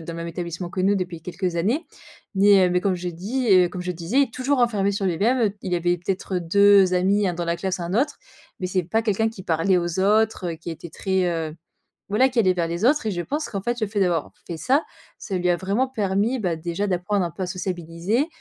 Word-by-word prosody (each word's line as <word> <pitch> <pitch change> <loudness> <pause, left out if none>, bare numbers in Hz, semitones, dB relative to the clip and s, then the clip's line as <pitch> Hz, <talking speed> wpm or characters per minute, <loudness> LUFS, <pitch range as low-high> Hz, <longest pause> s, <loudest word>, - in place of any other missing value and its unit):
dans 165 +1 -7
le - - -7
même 170 0 -5
établissement 170 +1 -5
que 185 - -3
nous 195 +2 +3
depuis 180 -4 -3
quelques 175 +1 -3
années. 230 - 0 0.5
Nais 195 -1 +6
heu, - - 0
mais 180 0 +2
comme 195 0 +1
je 180 0 -4
dis 215 +10 -3
heu 180 -1 +6
comme 180 +1 -6
je 180 0 -2
disais: 200 +12 +1
«toujours 265 +3 0
renfermé 215 -6 +2
sur 200 0 -2
lui-même» 200 +8 +2
heu, 210 -4 +1
il 180 -1 -2
avait 175 0 +1
peut-être 185 +1 -2
2 195 +2 +5
amis, 195 +2 +2
1 175 - -2
dans 175 0 -3
la 170 0 -1
classe 190 +1 -2
et - - -5
1 170 +1 -4
autre. 270 +9 0 0.4
Mais 185 - -2
c'est 185 -1 0
pas 220 +7 0
quelqu'un 220 0 +1
qui 220 -4 -9
parlait 170 +2 +2
aux 175 0 -1
autres, 205 -3 +2
heu, - - -7
qui 165 +1 -7
était 165 +1 -8
très, 190 +3 0
heu 165 -3 -2 0.6
voilà 225 +6 +4
qui 250 -2 -1
allait 190 -5 +4
vers 175 -2 -1
les 170 +4 -4
autres 290 +1 +3
et 215 - 0
je 175 - -2
pense 295 - -3
qu'en 195 -2 -4
fait, 240 +3 -2
le 215 - 0
fait 205 0 -1
d'avoir 175 -5 0
fait 170 - -5
ça, 270 - +2 0.3
ça 195 -4 -4
lui 180 0 0
a 175 - +4
vraiment 200 +9 0
permis, 215 +1 0
bah, 180 -6 -1
déjà 170 +4 -3
d'apprendre 190 +1 0
un 170 - -3
peu 185 +4 -5
à - - -1
sociabiliser, 180 - -2
185 Hz, 250 wpm, -23 LUFS, 175-210 Hz, 0.6 s, Nais